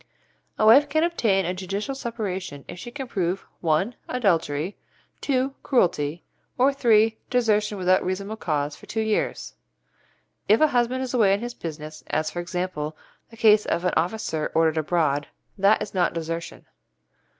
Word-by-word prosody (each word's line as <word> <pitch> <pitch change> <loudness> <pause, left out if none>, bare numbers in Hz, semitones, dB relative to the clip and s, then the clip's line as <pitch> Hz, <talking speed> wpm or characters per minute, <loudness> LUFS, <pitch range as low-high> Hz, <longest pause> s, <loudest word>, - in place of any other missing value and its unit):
A 215 - +2
wife 275 +7 +7
can 315 +2 +2
obtain 220 - +1
a 180 - -1
judicial 195 +7 -4
separation 195 - -5
if - - -8
she 240 - -7
can 270 +1 -6
prove 185 -3 -2
(1) 170 +8 +1 0.2
adultery, 175 -7 0 0.5
(2) 270 -1 0
cruelty, 165 - +1 0.3
or 270 +3 +4
(3) 225 -4 +3
desertion 210 -4 +1
without 185 0 +3
reasonable 195 +3 -3
cause 150 -6 -2
for - - -16
two 220 - -2
years. 220 -1 -1 1.0
If 215 - +6
a 310 - +5
husband 250 +1 +1
is 260 - -5
away 210 -6 +4
on 200 - +1
his 240 +1 -5
business, 155 -5 -8
as, 155 0 -1
for 175 - -5
example, 175 -3 -4 0.3
the 230 - -15
case 215 -2 +5
of 175 - -1
an 180 - +1
officer 165 -3 -1
ordered 160 -1 +3
abroad, 155 -3 0 0.3
that 200 +2 +3
is - - -9
not 180 -2 +1
desertion. 165 0 -5
195 Hz, 160 wpm, -24 LUFS, 165-235 Hz, 1.0 s, wife